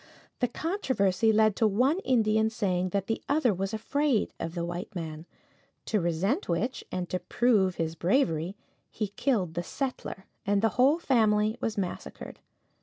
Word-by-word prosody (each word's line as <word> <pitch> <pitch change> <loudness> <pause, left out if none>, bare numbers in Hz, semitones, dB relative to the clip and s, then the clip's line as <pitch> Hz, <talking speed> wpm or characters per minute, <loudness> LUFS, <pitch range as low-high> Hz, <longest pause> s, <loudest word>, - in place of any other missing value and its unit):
The 245 - +2
controversy 235 - +1
led 215 -1 +4
to 225 - +4
one 255 - +2
Indian 220 - +2
saying 185 -5 0
that 195 +1 -1
the 225 - -2
other 280 -6 +3
was 195 +1 -2
afraid 255 +3 0
of 165 +1 -4
the 170 -1 -2
white 175 +4 -6
man, 160 -1 -6 0.6
to 210 -3 +1
resent 175 - 0
which, 205 +10 -1
and 180 -1 -2
to 185 - 0
prove 195 -1 +2
his 165 -1 -2
bravery, 175 - +1 0.3
he 210 -3 -3
killed 200 - 0
the 170 - -2
settler, 255 -2 -5 0.2
and 205 -1 +1
the 225 - +5
whole 260 - +4
family 220 -8 +2
was 225 -1 -2
massacred. 185 -3 -5
210 Hz, 160 wpm, -28 LUFS, 180-245 Hz, 0.6 s, the